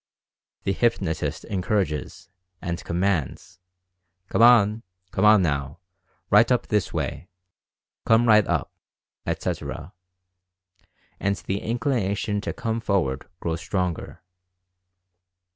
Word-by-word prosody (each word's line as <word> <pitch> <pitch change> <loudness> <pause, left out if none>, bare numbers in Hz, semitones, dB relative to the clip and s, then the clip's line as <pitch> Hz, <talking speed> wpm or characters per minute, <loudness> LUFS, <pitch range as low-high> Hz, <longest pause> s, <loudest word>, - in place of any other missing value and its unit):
The 95 - 0
hypnotist 95 -7 -1
encourages, 95 -5 -2 0.3
and 85 -1 -4
com 85 +1 -2
mands, 90 -4 -1 0.7
"Come - - +1
on, 115 -2 +6 0.3
come 100 - +1
on, 105 -2 +7
now; 70 -2 -1 0.5
right 105 +5 +6
up 125 - +2
this 105 -3 0
way; - - -4 0.7
come 115 +1 +4
right 105 -2 +6
up," - - -1 0.6
etc., 80 +6 -4 1.3
and 100 0 0
the 100 0 -3
inclination 110 -4 -1
to - - -3
"come 115 -1 -2
for 100 -3 +1
ward" 65 -4 -3
grows 85 0 -2
stronger. 90 -4 -3
100 Hz, 110 wpm, -24 LUFS, 85-110 Hz, 1.3 s, on